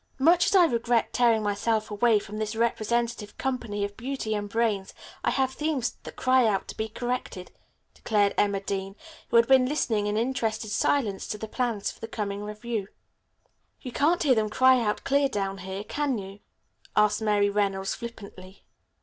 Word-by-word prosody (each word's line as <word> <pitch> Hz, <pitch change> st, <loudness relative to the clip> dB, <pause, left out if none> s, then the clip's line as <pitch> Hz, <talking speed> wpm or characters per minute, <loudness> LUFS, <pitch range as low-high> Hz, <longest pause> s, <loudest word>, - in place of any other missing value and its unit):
"Much 335 Hz, +6 st, +4 dB
as -, -, +2 dB
I 365 Hz, -2 st, +7 dB
regret 235 Hz, -4 st, +1 dB
tearing 230 Hz, -3 st, +3 dB
myself 215 Hz, +1 st, 0 dB
away 220 Hz, +2 st, +3 dB
from 210 Hz, +1 st, -6 dB
this 215 Hz, 0 st, -3 dB
representative 235 Hz, -1 st, -1 dB
company 235 Hz, -6 st, -2 dB
of 200 Hz, 0 st, -8 dB
beauty 245 Hz, -2 st, -3 dB
and 205 Hz, -1 st, -3 dB
brains, 210 Hz, -3 st, -1 dB, 0.3 s
I -, -, +2 dB
have 265 Hz, -1 st, +1 dB
themes 295 Hz, -4 st, -1 dB
that -, -, -10 dB
cry 255 Hz, -2 st, +3 dB
out 200 Hz, -3 st, 0 dB
to -, -, -6 dB
be 220 Hz, 0 st, -3 dB
corrected," 240 Hz, -5 st, -4 dB, 0.4 s
declared 205 Hz, -2 st, +1 dB
Emma 200 Hz, -1 st, +1 dB
Dean, 195 Hz, 0 st, -4 dB, 0.3 s
who -, -, -1 dB
had 230 Hz, 0 st, +6 dB
been 260 Hz, -1 st, +5 dB
listening 220 Hz, -8 st, 0 dB
in 210 Hz, +1 st, -1 dB
interested 225 Hz, -3 st, -1 dB
silence 215 Hz, -8 st, 0 dB
to 210 Hz, -, -4 dB
the 220 Hz, -, -6 dB
plans 230 Hz, -3 st, -2 dB
for -, -, -17 dB
the 225 Hz, -, -6 dB
coming 205 Hz, -3 st, -4 dB
revue. 210 Hz, 0 st, -4 dB, 0.9 s
"You 250 Hz, -, -7 dB
can't 315 Hz, +8 st, +2 dB
hear 280 Hz, -4 st, +5 dB
them 215 Hz, -2 st, +1 dB
cry 260 Hz, +3 st, +5 dB
out 210 Hz, -2 st, -1 dB
clear 280 Hz, 0 st, +2 dB
down 195 Hz, -4 st, -3 dB
here, 190 Hz, +2 st, -5 dB
can 275 Hz, +3 st, -1 dB
you?" 195 Hz, 0 st, -8 dB, 0.6 s
asked 210 Hz, +1 st, +3 dB
Mary 205 Hz, -2 st, +2 dB
Reynolds 195 Hz, -2 st, 0 dB
flippantly. 200 Hz, -5 st, -10 dB
220 Hz, 175 wpm, -27 LUFS, 205-250 Hz, 0.9 s, I